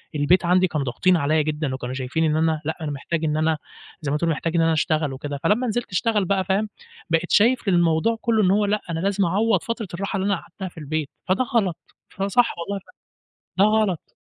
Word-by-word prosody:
البيت 150 +5 +3
عندي 180 +2 +4
كانوا 150 -4 -2
ضاغطين 175 +9 +2
عليّا 155 +1 +2
جدًا، 150 -2 -2
وكانوا 130 -1 -5
شايفين 130 +5 -1
إن 155 -1 +2
أنا 160 -1 +1
لأ، 160 +1 -2
أنا 155 -2 -3
محتاج 155 +4 -3
إن 150 0 0
أنا 160 0 +1 0.4
زي 145 -3 -2
ما 150 - +1
تقول 170 +2 0
محتاج 165 +1 -1
إن 170 - +4
أنا 165 0 +3
أشتغل 155 -2 0
وكده. 140 +1 -5
فلما 240 +5 +2
نزلت 240 0 -2
أشتغل 210 +1 +1
بقى 190 +1 +1
فاهم، 200 +3 0 0.4
بقيت 165 +1 0
شايف 235 +2 +3
الموضوع 175 +4 +2
كله 225 -2 +2
إن 185 - +4
هو 205 +1 +3
لأ، 210 +1 0
أنا 165 -1 -2
لازم 200 +2 +1
أعوض 200 +2 +1
فترة 230 -2 -4
الراحة 195 +3 -3
اللي 190 - -1
أنا 200 0 +2
قعدتها 190 +2 -8
في 175 - -26
البيت، 155 -1 -3 0.2
فده 190 +7 +2
غلط. 220 -10 0 0.3
فصح 200 +5 +1
والله 200 +4 -3 0.6
فعلًا، - - -34
ده 220 - +4
غلط. 190 -7 -2
170 Hz, 220 wpm, -23 LUFS, 155-200 Hz, 0.6 s, عندي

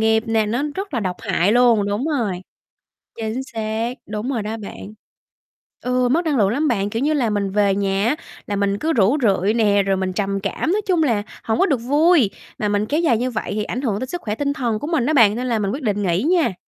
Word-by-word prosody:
nghiệp 220 0 +3
nè, 225 -1 +1
nó 240 +6 -1
rất 390 -6 -5
là 230 - 0
độc 185 -2 -2
hại 190 +5 +1
luôn, 235 -4 +4
đúng 205 +5 -1
rồi, 230 - -1 0.8
chính 225 +3 -3
xác, 225 0 -3
đúng 215 +5 -4
rồi 235 -5 -1
đó 220 +2 -4
bạn. 210 0 -9 0.9
Ừ, 250 0 +1
mất 330 +6 +1
năng 295 -3 +1
lượng 200 -4 +3
lắm 290 +8 0
bạn, 200 -5 0
kiểu 225 +4 -2
như 305 +2 +2
là, 260 -7 +1
mình 200 -2 -1
về 200 -1 +2
nhà 195 0 0
á, 250 - +2 0.3
là 205 - -2
mình 200 0 0
cứ 325 +1 0
rũ 225 +4 +3
rượi 200 -2 +2
nè, 205 -3 +3
rồi 195 -1 0
mình 185 -1 -2
trầm 195 0 -1
cảm, 200 - -2
nói 425 - +1
chung 350 -4 +3
là 225 -7 +1 0.2
hổng 220 0 -1
có - - +5
được 285 -8 +1
vui, 290 - +3 0.3
mà 210 - 0
mình 205 +1 +1
kéo 300 +7 0
dài 265 -10 +3
như 250 +2 -1
vậy 220 - -4
thì 210 - -1
ảnh 250 - -4
hưởng 215 -6 -1
đến 260 - -4
sức 350 +3 -4
khỏe 210 -1 -3
tinh 285 +1 -1
thần 235 -7 -1
của 290 - -5
mình 315 -7 +1
đó 310 - +1
bạn, 220 -6 +5
nên 250 +1 -3
là 230 -3 0
mình 200 -1 -1
quyết 270 +4 -5
định 205 -2 0
nghỉ 175 0 +1
nha. 325 - +2
225 Hz, 255 wpm, -21 LUFS, 205-265 Hz, 0.9 s, có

